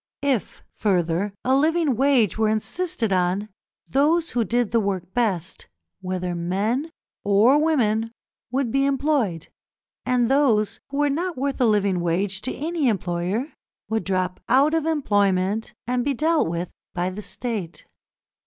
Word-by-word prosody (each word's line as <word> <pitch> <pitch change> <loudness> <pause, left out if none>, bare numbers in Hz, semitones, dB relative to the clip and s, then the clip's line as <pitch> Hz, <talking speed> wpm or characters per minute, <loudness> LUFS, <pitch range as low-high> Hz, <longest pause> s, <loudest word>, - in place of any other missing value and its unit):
If, 270 -6 -1
further, 180 -1 0
a 260 +1 +3
living 310 -1 +2
wage 260 -5 +3
were 220 -1 +2
insisted 225 - -1
on, 185 +3 0 0.4
those 315 +5 +2
who 240 - +1
did 235 +1 0
the 230 - +3
work 190 -3 -3
best, 190 -7 -1 0.3
whether 180 -1 -3
men 200 - -1 0.3
or 225 +9 +4
women, 225 -8 +1 0.4
would 255 -1 -1
be 275 +2 +2
employed, 270 - 0 0.5
and 250 -2 +2
those 250 -6 +2
who 280 - -5
were 290 -1 +2
not 345 +3 -2
worth 275 +1 -2
a - - +5
living 200 -4 +2
wage 185 +3 0
to 255 - -2
any 315 -2 0
employer 195 - -2 0.4
would 220 0 0
drop 185 -2 -1
out 275 +5 +4
of 325 -1 +1
employment 205 -7 +1
and 245 0 0
be 280 +1 0
dealt 315 - +2
with 170 +1 -3 0.2
by 180 +1 -1
the 200 +3 -7
State. 210 -7 -5
225 Hz, 145 wpm, -23 LUFS, 190-275 Hz, 0.5 s, a